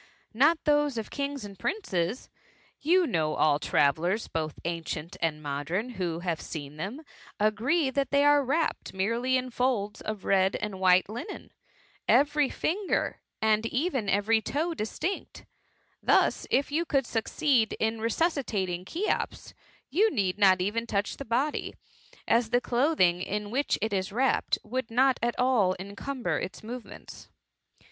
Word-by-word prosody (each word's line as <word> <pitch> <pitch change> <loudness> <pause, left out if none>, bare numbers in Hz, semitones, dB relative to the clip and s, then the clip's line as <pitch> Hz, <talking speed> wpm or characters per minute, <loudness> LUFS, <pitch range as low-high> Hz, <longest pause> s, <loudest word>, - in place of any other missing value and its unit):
" - - -38
Not 295 +9 +4
those 295 -3 +2
of 220 - -4
kings 280 -4 -3
and 200 -2 -11
princes. 220 - -2 0.5
You 355 +4 +3
know 160 - 0
all 150 -1 +3
tmveUers, 165 +11 +1
both 155 -2 -2
ancient 165 -1 -4
and 155 -2 -1
modem, 150 - -2
who 175 -7 -3
have 170 -3 -2
seen 145 -2 -7
them, 205 - -5 0.4
agree, 250 +9 +2
that 275 0 0
they 280 +1 +3
are 290 0 +5
wrapped 295 -2 -1
merely 230 +7 +1
in 255 0 -4
folds 230 -5 -1
of 215 -2 -5
red 190 0 +3
and 205 -3 -4
white 185 -1 +5
Hnen, 240 - -7 0.6
every 290 -1 +4
finger 380 +4 -1 0.2
and 220 +1 +3
even 260 - -1
every 210 +3 +3
toe 320 +8 -1
distinct; 320 - -4 0.6
thus, - - +2
if 275 +2 +1
you 320 +3 +1
could 275 -6 +1
succeed 230 +1 +1
in 220 +1 -1
resusdtaling 220 - -1
Cbec^M, 365 - -2 0.4
you 410 +10 +4
need 200 - -1
not 190 -3 +5
even 225 +5 -1
toudi 205 -1 -1
the 275 - -8
body; 255 +7 -1 0.5
as 230 -1 +3
the 245 - +3
clothing 240 - +2
in 205 +2 -3
which 280 +4 +1
it 220 -1 -1
is 190 0 -1
wrapped, 260 +5 +1
would 250 +2 -3
not 260 +3 +3
at 240 +1 0
all 235 -8 +3
encumber 215 +7 -3
its 185 - -6
movements." 240 +2 -9
225 Hz, 150 wpm, -28 LUFS, 190-275 Hz, 0.6 s, are